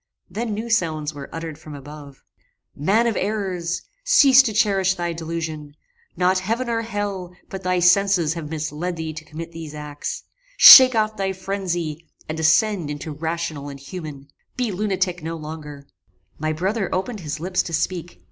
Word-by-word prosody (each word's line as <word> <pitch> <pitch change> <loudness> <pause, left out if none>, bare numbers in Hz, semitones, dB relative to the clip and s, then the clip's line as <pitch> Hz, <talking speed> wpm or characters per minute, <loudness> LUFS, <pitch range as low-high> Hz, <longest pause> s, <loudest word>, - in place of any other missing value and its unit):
Then 220 +2 -3
new 220 +3 -4
sounds 160 -9 0
were 140 -1 -9
uttered 165 -2 -6
from 155 -2 -10
above. 145 0 -11 0.5
"Man 200 +11 +2
of 230 -2 0
errors! 185 -4 -2 0.2
cease 275 - +7
to 250 -4 -2
cherish 195 -3 +2
thy 175 -2 -3
delusion: 160 -3 -5 0.4
not 185 +1 +2
heaven 230 +6 -2
or 230 0 0
hell, 205 -5 -4
but 190 - -6
thy 185 -1 0
senses 180 -2 +3
have 165 -3 -6
misled 155 +3 -3
thee 160 -1 -5
to 155 0 -8
commit 160 +2 -8
these 160 -2 -8
acts. 150 -1 -6 0.3
Shake 255 -2 +11
off 215 0 0
thy 195 -1 -1
phrenzy, 175 -4 -4 0.2
and 155 +1 -4
ascend 165 +1 +2
into 150 +2 -5
rational 160 -1 -4
and 140 -1 -9
human. 145 -2 -9 0.3
Be 245 -3 -1
lunatic 185 -2 -1
no 165 +1 -4
longer." 150 -2 -9 0.5
My 155 +1 -1
brother 190 +6 -1
opened 210 +4 -2
his 155 -3 -5
lips 180 +2 0
to - - -7
speak. 175 - -3
175 Hz, 165 wpm, -22 LUFS, 155-195 Hz, 0.5 s, Shake